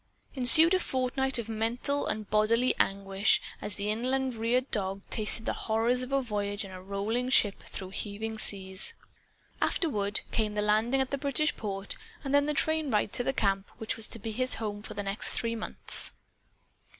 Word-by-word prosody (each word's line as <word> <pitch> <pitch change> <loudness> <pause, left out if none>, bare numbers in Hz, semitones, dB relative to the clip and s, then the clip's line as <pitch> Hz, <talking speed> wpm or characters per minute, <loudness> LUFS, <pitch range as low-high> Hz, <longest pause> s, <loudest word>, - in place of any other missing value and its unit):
Ensued 310 +7 +9
a 375 - +3
fortnight 265 -2 0
of 235 -2 -4
mental 230 +6 -2
and 215 -1 -3
bodily 230 +4 +2
anguish, 195 +1 +1 0.2
as 205 - +1
the 205 +1 -2
inland 260 +3 -1
reared 235 +3 -1
dog 195 -2 -2
tasted 220 +1 +1
the - - -1
horrors 230 +3 0
of 255 +1 -5
a 275 -1 +1
voyage 205 -3 -3
in 195 - -11
a 185 0 -9
rolling 205 +6 -2
ship, 210 -6 +3
through 190 -1 -8
heaving 220 +2 -5
seas. 190 - -1 0.7
Afterward, 210 - 0
came 215 -2 -1
the 210 - 0
landing 220 +6 +2
at 265 +1 -3
a 280 - -1
British 285 +2 0
port 195 -2 -5 0.3
and 275 -1 -3
the 285 +1 +3
train 315 -1 +1
ride 210 -3 0
to 245 - -1
the 270 - 0
camp 195 -5 -1
which 220 - -4
was 225 -1 -3
to - - -8
be 225 +1 -6
his 255 +4 0
home 210 -2 -5
for 215 0 -9
the 205 - -4
next 200 +2 0
three 230 0 -1
months. 220 - 0
225 Hz, 185 wpm, -28 LUFS, 205-255 Hz, 0.7 s, Ensued